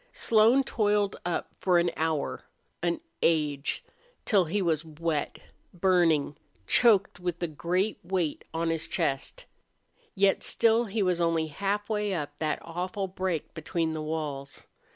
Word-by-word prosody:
Slone 230 +4 +4
toiled 205 -5 +1
up 175 - -2
for 180 -2 +3
an 170 0 +2
hour 160 -2 -2 0.4
an 170 0 -1 0.2
age 150 -4 +1 0.4
till 195 -5 +4
he 170 +6 -1
was 165 -5 +1
wet, 160 -1 -3 0.4
burning, 170 -5 +3 0.3
choked, 205 -7 +4
with 175 -1 -3
a - - +1
great 175 +8 -1
weight 175 -4 -2
on 165 0 -1
his 165 -1 -2
chest. 160 - -2 0.7
Yet 195 0 +3
still 230 +1 +3
he 210 0 -1
was 180 -2 +1
only 165 -1 +2
halfway 205 +3 -1
up 145 -3 -4
that 155 -1 0
awful 185 +4 -3
break 185 -3 -3
between 160 0 -2
the 155 -1 -4
walls. 150 -3 -5
175 Hz, 135 wpm, -28 LUFS, 160-195 Hz, 0.7 s, Slone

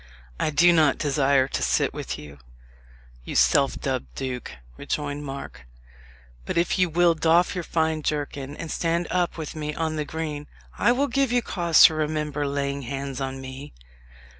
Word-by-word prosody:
"I - - +1
do 170 +4 +5
not 155 -4 +4
desire 140 -2 +2
to - - -2
sit - - +1
with - - -5
you, 70 -1 -11 0.8
you - - -7
self - - +3
dubbed 60 -2 -3
duke," 125 -2 -5 0.2
rejoined 145 - -3
Mark; 135 - -8 0.8
"but - - -4
if 170 +2 +1
you 180 -1 +3
will 170 +1 +4
doff 165 +2 +3
your 180 - -3
fine 160 -1 0
jerkin, 145 -1 -3
and 170 - -6
stand 170 +1 0
up 175 -1 0
with 160 -1 -6
me 150 -1 -4
on 160 -1 -2
the 150 - 0
green, 150 -1 -5 0.3
I - - +3
will 265 +3 +2
give 275 -3 +1
you 245 -1 +2
cause 170 -6 +4
to - - +8
remember 150 -1 -2
laying 140 0 -2
hands 135 +1 -5
on 135 0 -3
me." 135 +2 -9
150 Hz, 170 wpm, -25 LUFS, 140-165 Hz, 0.8 s, to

